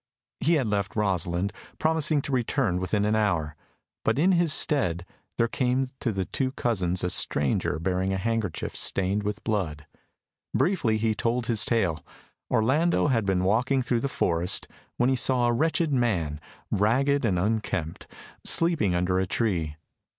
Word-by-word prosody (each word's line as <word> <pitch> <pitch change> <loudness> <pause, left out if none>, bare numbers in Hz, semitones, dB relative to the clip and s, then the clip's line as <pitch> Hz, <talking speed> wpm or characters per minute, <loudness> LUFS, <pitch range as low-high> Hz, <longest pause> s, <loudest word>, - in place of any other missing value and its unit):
He 165 +2 +2
had 140 -5 +1
left 100 -2 -2
Rosalind, 95 -2 0 0.2
promising 155 -2 +1
to - - -5
return 120 -6 0
within 100 +3 0
an 105 +1 +1
hour, 85 -8 0 0.5
but 115 - +1
in 175 +6 +4
his 170 -3 +3
stead 90 - +2 0.3
there 115 - +3
came 130 +2 0
to 120 - -1
the 95 -2 -2
two 130 +5 -2
cousins 95 -9 -1
a 90 - +1
stranger 70 -1 +1
bearing 95 +3 -1
a 95 - 0
handkerchief 110 -3 -2
stained 95 +2 +1
with 105 0 -4
blood. 85 -9 -2 0.7
Briefly 135 - +1
he 110 0 +1
told 115 +3 -1
his 115 -3 +2
tale. 95 -9 0 0.5
Orlando 150 +8 +2
had 115 -5 +1
been 95 -1 +1
walking 125 +7 +1
through 120 -1 0
the 140 - -1
forest, 85 -6 0 0.3
when 120 - +2
he - - +2
saw 125 -1 +1
a 120 - +2
wretched 160 +3 +1
man, 85 - 0 0.3
ragged 135 +8 +2
and 100 -6 +1
unkempt, 100 -4 -2 0.4
sleeping 165 - +3
under 90 +1 +1
a 95 - -1
tree. 85 -9 -1
110 Hz, 160 wpm, -26 LUFS, 90-130 Hz, 0.7 s, in